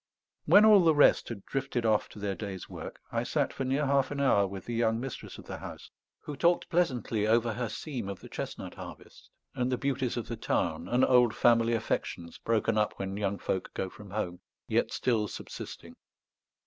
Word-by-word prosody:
When 210 +1 +7
all 210 -4 +8
the 160 -2 +5
rest 145 - +5
had 105 -5 -7
drifted 135 -3 -2
off 110 -2 +2
to - - -14
their 100 -1 -2
day's 95 -2 -6
work, - - -8
I - - 0
sat - - 0
for - - -3
near 135 +3 +1
half 135 -1 +2
an 145 - -4
hour 105 -8 +4
with 95 -1 -8
the 120 - -4
young 115 -1 +1
mistress 130 0 -6
of - - -11
the - - -6
house, - - -9 0.3
who 150 - -6
talked 170 +5 +2
pleasantly 125 - +1
over 115 +1 +3
her 120 +1 -3
seam 120 -4 -5
of 100 - -6
the - - -10
chestnut - - -6
harvest, - - -11 0.2
and 125 +1 -1
the 125 - +1
beauties 135 -3 -1
of 120 - -3
the 115 - -4
Tarn, 85 -5 -1
and 125 +4 +3
old 125 -3 +4
family 115 -1 +4
affections, 85 -6 -3
broken 115 -1 +1
up 105 - +1
when 95 0 -4
young 100 -1 -1
folk 95 -1 -3
go 95 - -3
from 105 -2 -12
home, 90 -3 -3 0.3
yet - - +1
still 110 -4 +1
subsisting. - - -8
115 Hz, 200 wpm, -30 LUFS, 105-130 Hz, 0.3 s, all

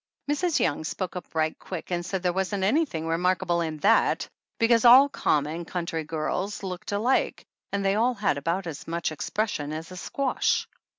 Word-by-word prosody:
Mrs. 335 +2 +1
Young 155 0 0
spoke 180 +3 -4
up 180 -2 -8
right 155 0 +1
quick 185 -1 -7
and 175 -1 -1
said 185 +1 -3
there 180 -1 +1
wasn't 190 +1 -1
anything 205 - +1
remarkable 175 +1 +1
in 160 -2 -3
that, - - +3 0.3
because 230 0 +4
all 255 +3 +9
common, 155 - 0
country 170 -2 -3
girls 165 +7 -3
looked 190 +2 -5
alike 220 +6 +1 0.3
and 200 -1 -1
they 195 - +3
all 240 +4 +2
had 195 -9 0
about 170 +6 -1
as 160 -4 -7
much 170 0 -2
expression 155 -2 -2
as 160 +3 -6
a 185 - -8
squash. 270 +7 0
180 Hz, 175 wpm, -26 LUFS, 165-210 Hz, 0.3 s, all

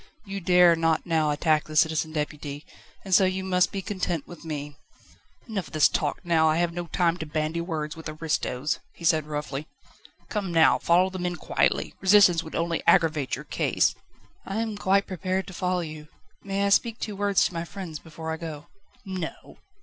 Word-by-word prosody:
You 195 0 -5
dare 180 -1 +6
not 165 -1 +1
now 160 -3 +1
attack 155 +1 +2
the 155 - -9
Citizen 160 0 +2
Deputy, 150 -1 -4 0.4
and 190 - -2
so 190 - +7
you 190 0 0
must 180 -1 +2
be 195 -1 -4
content 180 -6 -2
with 175 - -11
me." 145 -2 -5 0.7
"Enough 200 -7 -3
of - - -17
this 155 -2 +6
talk 150 +4 -2
now; 160 -2 +4
I 155 - +2
have 170 0 +1
no 175 0 -5
time 170 -1 +1
to 160 - -5
bandy 155 +2 -2
words 155 -3 -4
with 160 -1 -7
aristos," 155 -3 -2 0.2
he 170 - -8
said 155 -2 +3
roughly. 150 -1 -4 0.6
"Come 200 -4 -3
now, 165 -1 +5
follow 180 +2 +3
the 185 - -6
men 175 0 -2
quietly. - - 0
Resistance 190 -3 +6
would 160 - -9
only 165 0 -1
aggravate 155 -6 +3
your - - -9
case." - - +1 0.5
"I 195 - -4
am 220 -2 -3
quite 200 0 +2
prepared 185 +1 -2
to 190 - -10
follow 180 0 -1
you. 155 -2 -8 0.4
May 200 0 -1
I - - +2
speak 230 +3 +2
two 210 - -5
words 200 -1 +2
to - - -2
my 165 0 -3
friends 170 -4 -7
before 160 0 -7
I 160 - -3
go?" 160 -3 -8 0.4
"No." 185 -4 -6
170 Hz, 195 wpm, -26 LUFS, 155-185 Hz, 0.7 s, so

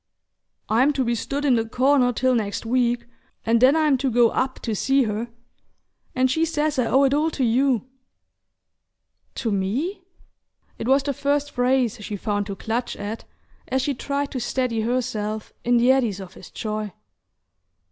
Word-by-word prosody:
"I'm 255 +7 +3
to 270 - 0
be 235 -1 0
stood 275 +5 -3
in 270 - +4
the 230 -2 +2
corner 255 0 +3
till 255 +2 +1
next 215 -2 -2
week, 240 0 +1 0.4
and 230 +1 +3
then 265 +4 +6
I'm 305 -4 +3
to 270 0 0
go 240 -1 +4
up 260 +3 -1
to 225 - -2
see 270 +6 +2
her. 220 +1 -2 0.9
And 255 0 +2
she 320 +4 +1
says 305 -3 0
I 240 - +2
owe 270 +3 +4
it 275 0 +3
all 305 +3 +2
to 290 -4 -2
you!" 250 +1 +2 1.5
"To 230 -4 -2
me?" 230 - -1 0.8
It 225 - -4
was 270 +1 +4
the 280 0 -1
first 290 +2 -1
phrase 245 -3 +1
she 210 - -4
found 205 0 -2
to 200 - -4
clutch 230 +4 -3
at 210 +2 -6 0.4
as 265 -1 0
she 285 - 0
tried 280 +2 -3
to 260 - -3
steady 240 -1 -1
herself 220 -3 -2
in 240 0 +3
the 245 +2 +5
eddies 235 -7 +1
of 190 -1 -9
his - - -13
joy. 215 -2 -4
250 Hz, 175 wpm, -23 LUFS, 225-275 Hz, 1.5 s, then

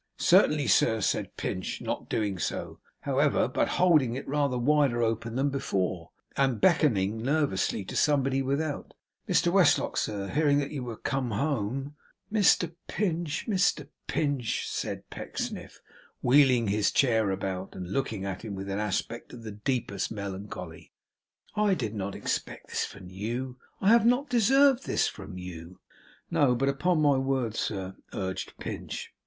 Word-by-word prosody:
'Certainly, 150 -2 +4
sir,' 110 +1 +3
said 100 - -1
Pinch; 95 - -3
not - - -4
doing 100 -4 -1
so, - - -3 0.2
however, - - +2
but - - 0
holding 155 -10 +4
it 135 - -6
rather 140 -2 +1
wider 130 -2 +2
open 115 0 -1
than 140 +2 +1
before, 95 -10 -2 0.3
and 135 -5 +1
beckoning 110 - +3
nervously 125 -7 0
to - - -7
somebody 135 -2 +2
without: 140 +3 -2 0.3
'Mr 175 - +3
Westlock, 185 -5 +4
sir, 100 -2 -2
hearing 145 -1 +3
that 145 -1 -1
you 140 -4 -4
were 120 -3 -6
come 135 -3 -2
home 135 +3 -2 0.2
' - - -21
'Mr 185 -5 +4
Pinch, 170 -6 -2
Mr 180 -8 +1 0.2
Pinch!' 140 -6 -1
said - - -4
Pecksniff, - - -6 0.4
wheeling 125 -4 +5
his 105 0 +2
chair 110 -6 +3
about, 95 0 -3
and 90 -1 -6
looking 110 -8 -2
at 95 -1 -4
him 105 -3 -5
with 95 +1 -5
an 100 - -2
aspect 105 +3 -3
of 120 -2 -10
the 110 - -6
deepest 105 -2 -2
melancholy, 100 -5 -7 0.6
'I 210 -2 +3
did 115 - -3
not 100 -2 -4
expect - - -4
this - - -1
from 95 -2 -11
you. 120 +6 -4 0.2
I 195 - +3
have 230 0 +6
not 255 +4 +2
deserved 265 +3 +4
this - - +2
from 95 -2 -8
you!' 90 -1 -9 0.5
'No, 130 -4 +3
but 135 +3 +1
upon 155 +4 +1
my 145 -2 +4
word, 130 -4 0
sir 95 -4 -3
' - - -23
urged 95 -1 -4
Pinch. - - -6
125 Hz, 155 wpm, -28 LUFS, 100-145 Hz, 0.6 s, have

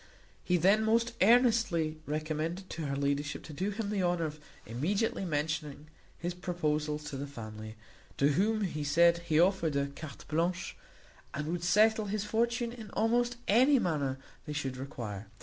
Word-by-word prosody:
He 180 - +2
then 195 +6 +4
most 230 +2 +2
earnestly 215 -8 +4
recommended 155 +5 -3
to 160 -2 -4
her 140 - -2
ladyship 140 +1 -1
to 155 - -9
do 185 +7 -1
him 205 0 -3
the 205 -2 0
honour 175 -2 +1
of 155 0 -6 0.3
immediately 190 - -1
mentioning 150 -1 -3 0.3
his 175 +1 -3
proposals 155 -4 -2
to 135 - -4
the 140 +1 -4
family; 110 -4 -8 0.4
to 140 - +4
whom 210 +8 +2
he 160 -7 -2
said 170 +4 +4
he 165 -2 +1
offered 170 -4 +3
a 140 0 0
carte 155 -4 -9
blanche, 170 +4 -1 0.6
and 150 - -3
would 170 0 -2
settle 215 +4 +4
his 205 0 -2
fortune 235 +2 0
in 225 -3 -9
almost 240 +2 +1
any 260 +7 +5
manner 145 - 0 0.3
they 150 - -3
should 135 -3 -3
require. 115 -7 -6
170 Hz, 165 wpm, -31 LUFS, 150-210 Hz, 0.6 s, any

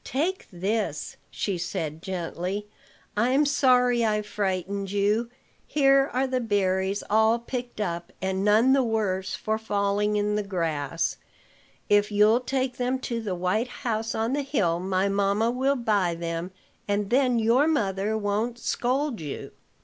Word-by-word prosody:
"Take 335 +9 -2
this," 190 -3 -2
she 195 -4 -2
said 160 -2 -4
gently. 185 +2 -4 0.5
"I'm 255 +7 +3
sorry 250 -4 +3
I 210 -1 +1
frightened 195 -1 -2
you. 205 +4 +1 0.4
Here 275 -1 +4
are 260 +2 +1
the 260 -1 -1
berries 195 -3 0
all 220 +2 +4
picked 240 0 -6
up, 170 -4 -3
and 190 +1 -1
none 220 +6 +5
the 275 - +4
worse 210 -5 -1
for 220 0 -2
falling 205 -1 0
in 210 0 +1
the 210 - +1
grass. 165 -5 -2 0.7
If 205 0 +3
you'll 210 +3 +5
take 260 0 -2
them 250 +1 0
to 235 -3 -3
the 200 -4 -3
white 185 +7 0 0.2
house 225 -1 -1
on 225 +3 0
the 290 - +1
hill, 205 - 0
my 190 +1 0
mamma 200 +3 +1
will 265 +3 +1
buy 205 -8 +1
them, 170 +1 -4 0.4
and 205 0 -1
then 250 -1 +3
your 235 +6 +3
mother 210 -7 0
won't 215 +3 -1
scold 250 - -1
you." 145 -3 -6
210 Hz, 150 wpm, -26 LUFS, 190-245 Hz, 0.7 s, none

